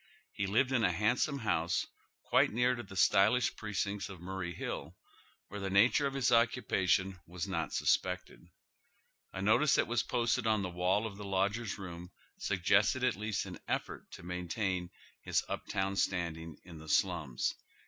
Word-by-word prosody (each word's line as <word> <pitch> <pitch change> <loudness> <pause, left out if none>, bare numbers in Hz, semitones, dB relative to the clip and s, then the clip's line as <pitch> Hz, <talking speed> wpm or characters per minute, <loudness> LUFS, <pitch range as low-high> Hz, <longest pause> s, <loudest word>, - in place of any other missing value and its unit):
He 100 - -2
lived 125 +7 +2
in 120 -4 +2
a 90 - +4
handsome 115 - +1
house 85 -8 0 0.4
quite - - +3
near 125 +3 +2
to 120 - -4
the 95 -4 -11
stylish 105 +6 +4
pi'ecincts 105 -1 -3
of 95 -3 -9
Murray 90 0 -4
Hill, - - -5 0.5
where 105 - -7
the 100 -1 -3
nature 115 +9 +4
of 135 - -5
his 135 -3 +2
occupa 115 -5 +2
tion 95 +1 +2
was 85 -1 -5
not - - -2
suspected. 85 - -1 0.8
A 95 - -5
notice 120 +7 +4
that - - +3
was 120 0 +1
posted 120 -1 0
on 110 -2 +2
the 90 - -2
wall 90 +5 +1
of 100 -3 -6
the 105 - -7
lodgers' 100 +2 -1
room 90 -2 -8 0.3
snggested 105 +6 +2
at - - +1
least 105 0 -2
an - - -8
efEort - - -3
to - - -10
maintain 90 +1 -2 0.3
hie - - -9
up - - -5
town 95 +1 -1
standing 85 -4 -2
in 85 -3 -11
the 80 - -11
alums. 80 -8 +1
100 Hz, 170 wpm, -33 LUFS, 90-110 Hz, 0.8 s, a